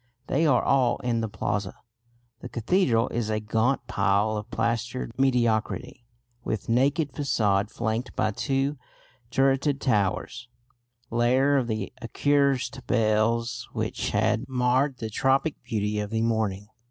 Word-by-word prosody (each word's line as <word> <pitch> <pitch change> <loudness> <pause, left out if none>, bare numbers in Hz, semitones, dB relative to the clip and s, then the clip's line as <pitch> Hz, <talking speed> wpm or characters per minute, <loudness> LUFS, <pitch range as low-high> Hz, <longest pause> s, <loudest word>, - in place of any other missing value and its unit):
They 155 +5 +1
are 125 -5 +3
all 130 -3 +3
in 120 -2 0
the 110 - -2
Plaza. 100 -1 -3 0.6
The - - -8
cathedral 120 - +2
is 115 -2 -2
a 110 0 0
gaunt 110 +4 0
pile 100 -1 +1
of 105 +2 -5
plastered 115 +2 -2
mediocrity, 120 -2 0 0.4
with 110 -5 -3
naked 140 +5 +2
façade 105 -8 +1
flanked 110 +3 -3
by 110 - +1
two 135 +4 -1 0.5
turreted 135 +2 +2
towers, 115 +1 -1 0.6
lair 130 +4 +3
of 130 -4 +1
the 110 -3 -3
accursed 140 +2 +1
bells 115 +1 +1
which - - -2
had - - +1
marred 130 +2 +1
the 110 -2 -5
tropic 135 +6 +1
beauty 105 -1 -2
of 105 -1 -3
the 110 +1 -1
morning. 110 -4 0
115 Hz, 130 wpm, -26 LUFS, 110-135 Hz, 0.6 s, are